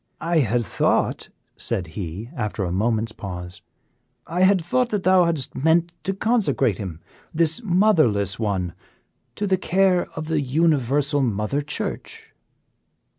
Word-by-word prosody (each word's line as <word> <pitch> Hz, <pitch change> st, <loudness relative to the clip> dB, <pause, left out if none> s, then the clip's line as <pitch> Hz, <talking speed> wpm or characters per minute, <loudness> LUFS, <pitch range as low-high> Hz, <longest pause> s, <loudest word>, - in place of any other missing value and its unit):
I 165 Hz, 0 st, +1 dB
had 120 Hz, -3 st, +1 dB
thought," -, -, 0 dB, 0.3 s
said 90 Hz, -, 0 dB
he, 95 Hz, +6 st, -6 dB
after 105 Hz, -5 st, -3 dB
a 90 Hz, -, -2 dB
moment's 110 Hz, +3 st, 0 dB
pause, 90 Hz, -4 st, -8 dB, 0.6 s
"I 170 Hz, +3 st, -4 dB
had 185 Hz, -3 st, +4 dB
thought 250 Hz, +6 st, +1 dB
that 210 Hz, -4 st, -2 dB
thou 185 Hz, -1 st, +5 dB
hadst 160 Hz, -6 st, -1 dB
meant 165 Hz, +4 st, +2 dB
to 195 Hz, -, -1 dB
consecrate 180 Hz, -, +1 dB
him 90 Hz, -5 st, -6 dB, 0.3 s
this 165 Hz, +4 st, +2 dB
motherless 155 Hz, -, +2 dB
one 95 Hz, -6 st, -1 dB, 0.6 s
to 205 Hz, -, -2 dB
the 190 Hz, -2 st, +2 dB
care 185 Hz, -1 st, +2 dB
of 155 Hz, -1 st, -5 dB
the 160 Hz, -2 st, 0 dB
Universal 145 Hz, 0 st, +1 dB
Mother 115 Hz, +3 st, -1 dB
Church." 145 Hz, +1 st, -5 dB
145 Hz, 135 wpm, -23 LUFS, 105-175 Hz, 0.6 s, thou